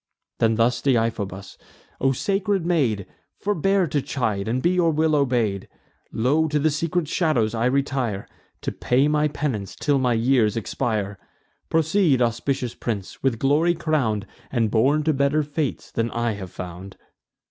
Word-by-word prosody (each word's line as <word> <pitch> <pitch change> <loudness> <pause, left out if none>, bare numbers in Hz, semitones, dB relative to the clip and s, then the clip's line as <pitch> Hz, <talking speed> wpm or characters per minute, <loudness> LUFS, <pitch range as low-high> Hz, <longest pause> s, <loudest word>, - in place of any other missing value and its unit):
Then 115 0 +3
thus 120 +2 +2
Deiphobus: 115 -7 -1 0.4
"O 135 - +3
sacred 195 +5 0
maid, 130 - +1 0.3
Forbear 195 -1 +1
to 145 -2 -1
chide, 110 -8 -2
and 120 +3 0
be 170 +7 +2
your 180 -2 +3
will 155 0 +2
obey'd! 120 -8 0 0.4
Lo! 145 +8 +2
to 150 0 0
the 155 +2 +2
secret 165 +2 -1
shadows 145 -10 +1
I 115 0 0
retire, 130 -6 0 0.3
To - - -2
pay 130 +4 +2
my 150 0 +2
penance 135 -10 -3
till 145 -2 +1
my 125 -2 +2
years 115 -1 +2
expire. 105 -2 -2 0.5
Proceed, 160 -2 +3
auspicious 120 +1 -1
prince, 105 -5 -5
with 130 -4 +1
glory 150 +8 +2
crown'd, 140 -11 0 0.3
And 115 -4 +1
born 135 +7 +3
to 155 0 +2
better 140 +2 +2
fates 145 -1 -3
than 115 0 -1
I 120 0 -1
have 100 -3 -6
found." 90 +2 -8
130 Hz, 150 wpm, -23 LUFS, 115-155 Hz, 0.5 s, Then